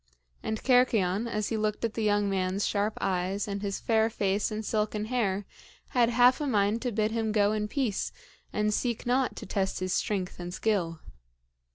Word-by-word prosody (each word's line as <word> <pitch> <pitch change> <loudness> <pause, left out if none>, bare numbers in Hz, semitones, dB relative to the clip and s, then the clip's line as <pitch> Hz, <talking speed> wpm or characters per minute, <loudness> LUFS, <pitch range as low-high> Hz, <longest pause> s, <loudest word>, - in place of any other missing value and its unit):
And 220 - -2
Cercyon, 230 -5 +3
as 215 -2 -2
he 225 - -1
looked 215 +1 -1
at 225 - -2
the 225 - -3
young 205 -1 +2
man's 190 0 0
sharp 210 +1 0
eyes 190 +2 -1
and 200 -1 -3
his 200 -1 -2
fair 220 -1 +2
face 200 -2 0
and 215 0 -4
silken 210 0 -1
hair, 205 -5 0 0.4
had 240 -3 +3
half 245 +3 +5
a 295 - -1
mind 210 -2 +2
to 250 - -1
bid 215 0 0
him 225 -1 -1
go 205 -1 +3
in 210 -1 -1
peace 240 -3 -1 0.4
and 210 0 +1
seek 235 +1 -1
not 250 +1 +1
to - - -7
test 190 0 -1
his 185 0 -1
strength 185 -3 -1
and 175 +1 -5
skill. 185 -6 0
210 Hz, 190 wpm, -28 LUFS, 200-225 Hz, 0.4 s, half